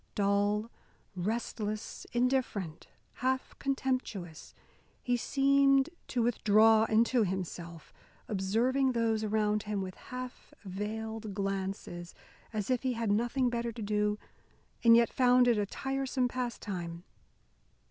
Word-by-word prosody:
Dull, 205 Hz, +2 st, +1 dB, 0.4 s
restless, 215 Hz, +2 st, -3 dB
indifferent, 240 Hz, -9 st, -1 dB, 0.3 s
half 260 Hz, +1 st, 0 dB
contemptuous, 255 Hz, -, -3 dB, 0.5 s
he 245 Hz, -, +1 dB
seemed 275 Hz, +2 st, +3 dB, 0.2 s
to 245 Hz, -2 st, 0 dB
withdraw 220 Hz, -1 st, +5 dB
into 230 Hz, +3 st, +3 dB
himself, 170 Hz, -6 st, -5 dB, 0.3 s
observing 235 Hz, +7 st, +1 dB
those 225 Hz, -2 st, +1 dB
around 210 Hz, 0 st, +1 dB
him 210 Hz, -1 st, -3 dB
with 190 Hz, -1 st, -4 dB
half 250 Hz, +4 st, -9 dB
veiled 215 Hz, +2 st, -4 dB
glances, 195 Hz, -3 st, -4 dB, 0.4 s
as 215 Hz, +1 st, -2 dB
if 250 Hz, -, +1 dB
he 260 Hz, -1 st, 0 dB
had 230 Hz, -3 st, -1 dB
nothing 240 Hz, +5 st, +1 dB
better 235 Hz, 0 st, -2 dB
to 230 Hz, 0 st, -8 dB
do 210 Hz, 0 st, +1 dB, 0.7 s
and 230 Hz, -1 st, +8 dB
yet 235 Hz, 0 st, +3 dB
found 250 Hz, -1 st, +5 dB
it 235 Hz, -3 st, +4 dB
a 205 Hz, -, 0 dB
tiresome 270 Hz, +1 st, -1 dB
pastime. 195 Hz, -9 st, -4 dB
220 Hz, 115 wpm, -31 LUFS, 200-250 Hz, 0.7 s, and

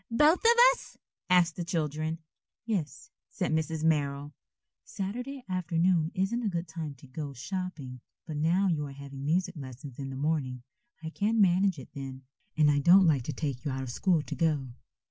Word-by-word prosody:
"Both 300 Hz, +9 st, +4 dB
of 465 Hz, +1 st, +6 dB, 0.2 s
us?" -, -, -12 dB, 0.3 s
asked 175 Hz, -2 st, +4 dB
the 175 Hz, -, -2 dB
children. 155 Hz, -1 st, -2 dB, 0.5 s
"Yes," 165 Hz, -, -3 dB, 0.2 s
said 180 Hz, -5 st, -2 dB
Mrs. 160 Hz, 0 st, -1 dB
Merrill. 145 Hz, -2 st, 0 dB, 0.5 s
"Saturday 245 Hz, +7 st, -5 dB
afternoon 175 Hz, -2 st, +1 dB
isn't 195 Hz, +6 st, 0 dB
a 220 Hz, -, 0 dB
good 175 Hz, -1 st, -3 dB
time 160 Hz, -3 st, -6 dB
to 130 Hz, -, -16 dB
go 140 Hz, +2 st, -6 dB
shopping, 140 Hz, -3 st, -5 dB, 0.2 s
but 155 Hz, -3 st, -5 dB
now 170 Hz, +6 st, +2 dB
you 150 Hz, -5 st, 0 dB
are 140 Hz, -, -9 dB
having 140 Hz, 0 st, -9 dB
music 180 Hz, +5 st, 0 dB
lessons 130 Hz, -2 st, -9 dB
in 135 Hz, -1 st, -4 dB
the 135 Hz, -, -6 dB
morning, 135 Hz, -4 st, -1 dB, 0.4 s
I 160 Hz, -, -5 dB
can't 215 Hz, +5 st, 0 dB
manage 190 Hz, -2 st, +4 dB
it 130 Hz, -, -10 dB
then. 135 Hz, -1 st, -7 dB, 0.3 s
And 150 Hz, -1 st, +5 dB
I 145 Hz, -, +2 dB
don't 180 Hz, +6 st, +7 dB
like 150 Hz, -6 st, +3 dB
to 150 Hz, -, -3 dB
take 140 Hz, -3 st, -3 dB
you 150 Hz, -, -2 dB
out 130 Hz, 0 st, -3 dB
of 125 Hz, -, -5 dB
school 170 Hz, +3 st, +1 dB
to -, -, -6 dB
go." 150 Hz, -6 st, 0 dB
160 Hz, 185 wpm, -29 LUFS, 140-185 Hz, 0.5 s, don't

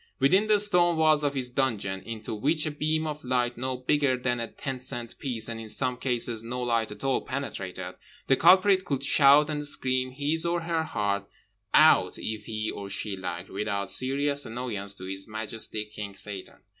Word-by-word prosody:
Within 190 Hz, +11 st, +4 dB
the 210 Hz, -1 st, +4 dB
stone 175 Hz, -4 st, +5 dB
walls 155 Hz, -1 st, +4 dB
of 145 Hz, -1 st, 0 dB
his 125 Hz, -2 st, -2 dB
dungeon 105 Hz, -8 st, -1 dB
(into 110 Hz, +2 st, -6 dB
which 150 Hz, +9 st, 0 dB
a 155 Hz, -, -1 dB
beam 155 Hz, +2 st, -1 dB
of 150 Hz, -1 st, -5 dB
light 125 Hz, -1 st, 0 dB
no 130 Hz, +1 st, -3 dB
bigger 135 Hz, 0 st, +1 dB
than 125 Hz, -1 st, -1 dB
a 115 Hz, -, -3 dB
ten 135 Hz, 0 st, -5 dB
cent 120 Hz, -2 st, -4 dB
piece, 120 Hz, -5 st, -1 dB
and 115 Hz, -1 st, -5 dB
in 110 Hz, -, -8 dB
some 125 Hz, +2 st, 0 dB
cases 120 Hz, -3 st, 0 dB
no 125 Hz, +2 st, -5 dB
light 115 Hz, -3 st, 0 dB
at 105 Hz, -, -9 dB
all, 135 Hz, -1 st, +1 dB
penetrated) 95 Hz, -9 st, -5 dB, 0.3 s
the 135 Hz, -, +4 dB
culprit 185 Hz, +4 st, +5 dB
could 140 Hz, -6 st, -2 dB
shout 145 Hz, +1 st, +6 dB
and 150 Hz, -1 st, -3 dB
scream 130 Hz, -3 st, 0 dB
his 145 Hz, +5 st, -1 dB
or 170 Hz, 0 st, 0 dB
her 165 Hz, -1 st, -1 dB
heart 100 Hz, -6 st, -2 dB, 0.4 s
out -, -, +5 dB
if 110 Hz, -1 st, -5 dB
he 110 Hz, 0 st, -3 dB
or 100 Hz, -1 st, -7 dB
she 100 Hz, 0 st, -3 dB
liked, 95 Hz, -1 st, -6 dB
without 100 Hz, 0 st, -1 dB
serious 140 Hz, +2 st, 0 dB
annoyance 110 Hz, -4 st, -4 dB
to -, -, -10 dB
His 95 Hz, +1 st, -6 dB
Majesty 110 Hz, 0 st, -4 dB
King 105 Hz, -2 st, -8 dB
Satan. 100 Hz, -1 st, -7 dB
125 Hz, 190 wpm, -27 LUFS, 110-145 Hz, 0.4 s, shout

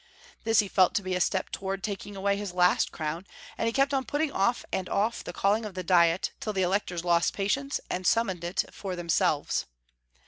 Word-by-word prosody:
This 225 Hz, -1 st, +3 dB
he 205 Hz, -, -4 dB
felt 185 Hz, -1 st, +3 dB
to 205 Hz, -, +1 dB
be 185 Hz, 0 st, -2 dB
a 180 Hz, -, 0 dB
step 190 Hz, +1 st, 0 dB
towards 195 Hz, 0 st, -4 dB
taking 205 Hz, -1 st, -5 dB
away 200 Hz, +1 st, +1 dB
his 200 Hz, -3 st, -5 dB
last 180 Hz, 0 st, +3 dB
crown, 160 Hz, +4 st, -4 dB, 0.3 s
and 230 Hz, -, -1 dB
he -, -, +2 dB
kept 275 Hz, +3 st, +2 dB
on 270 Hz, -1 st, +1 dB
putting 290 Hz, +2 st, -1 dB
off 235 Hz, +3 st, +1 dB
and 185 Hz, -1 st, -2 dB
off 215 Hz, +4 st, 0 dB
the -, -, -6 dB
calling 200 Hz, +5 st, +1 dB
of 210 Hz, -3 st, -7 dB
the 185 Hz, -, -3 dB
diet 170 Hz, 0 st, +3 dB
till 215 Hz, -, -3 dB
the 190 Hz, -1 st, +1 dB
Electors 180 Hz, -2 st, -1 dB
lost 170 Hz, -1 st, +3 dB
patience, 275 Hz, +8 st, -1 dB
and 185 Hz, -, -3 dB
simimoned 190 Hz, -3 st, +1 dB
it 175 Hz, +2 st, -1 dB
for 190 Hz, -2 st, -5 dB
themselves. 165 Hz, -4 st, 0 dB
195 Hz, 210 wpm, -28 LUFS, 180-210 Hz, 0.3 s, This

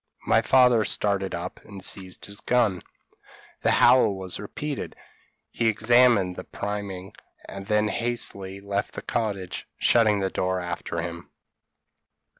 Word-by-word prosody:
My -, -, +4 dB
father 125 Hz, -4 st, +5 dB
started 100 Hz, -3 st, 0 dB
up, 85 Hz, +2 st, -6 dB
and 100 Hz, -3 st, -7 dB
seized 95 Hz, -2 st, -4 dB
his 100 Hz, 0 st, -5 dB
gun: 115 Hz, -7 st, +1 dB, 0.8 s
the -, -, +2 dB
howl 115 Hz, -6 st, +5 dB
was 95 Hz, -2 st, -5 dB
repeated, 145 Hz, +7 st, -5 dB, 0.6 s
he 115 Hz, -, 0 dB
examined 110 Hz, -3 st, +4 dB
the 90 Hz, -, -5 dB
priming, 100 Hz, -2 st, -5 dB, 0.3 s
and 100 Hz, 0 st, -8 dB
then 105 Hz, 0 st, +2 dB
hastily 105 Hz, -5 st, -2 dB
left 100 Hz, 0 st, -3 dB
the -, -, -6 dB
cottage, 100 Hz, -5 st, -3 dB
shutting 110 Hz, -3 st, +4 dB
the 95 Hz, -1 st, -1 dB
door 95 Hz, 0 st, -1 dB
after 85 Hz, -1 st, -4 dB
him. 85 Hz, 0 st, -7 dB
100 Hz, 130 wpm, -25 LUFS, 95-110 Hz, 0.8 s, father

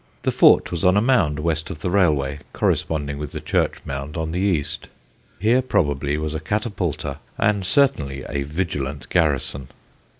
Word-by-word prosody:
The -, -, +1 dB
fort -, -, +5 dB
was 85 Hz, -2 st, -3 dB
on 90 Hz, +2 st, +5 dB
a -, -, +6 dB
mound 105 Hz, -, +2 dB
west 80 Hz, -1 st, -1 dB
of 80 Hz, -6 st, -7 dB
the 90 Hz, -, -1 dB
railway, 75 Hz, -8 st, +2 dB
corresponding 70 Hz, -3 st, -1 dB
with 75 Hz, -1 st, -6 dB
the -, -, -4 dB
church -, -, 0 dB
mound 70 Hz, +3 st, -5 dB
on 80 Hz, 0 st, -2 dB
the 90 Hz, -, -2 dB
east. 80 Hz, -6 st, -1 dB, 0.5 s
Here 115 Hz, +6 st, +3 dB
probably 75 Hz, -, 0 dB
was 75 Hz, 0 st, -3 dB
a 80 Hz, -, -2 dB
catapulta 90 Hz, -, -2 dB, 0.2 s
and 105 Hz, -2 st, +1 dB
certainly 80 Hz, -, +1 dB
a 70 Hz, 0 st, -2 dB
vigilant 70 Hz, -2 st, -3 dB
garrison. 70 Hz, -2 st, 0 dB
80 Hz, 165 wpm, -22 LUFS, 70-95 Hz, 0.5 s, a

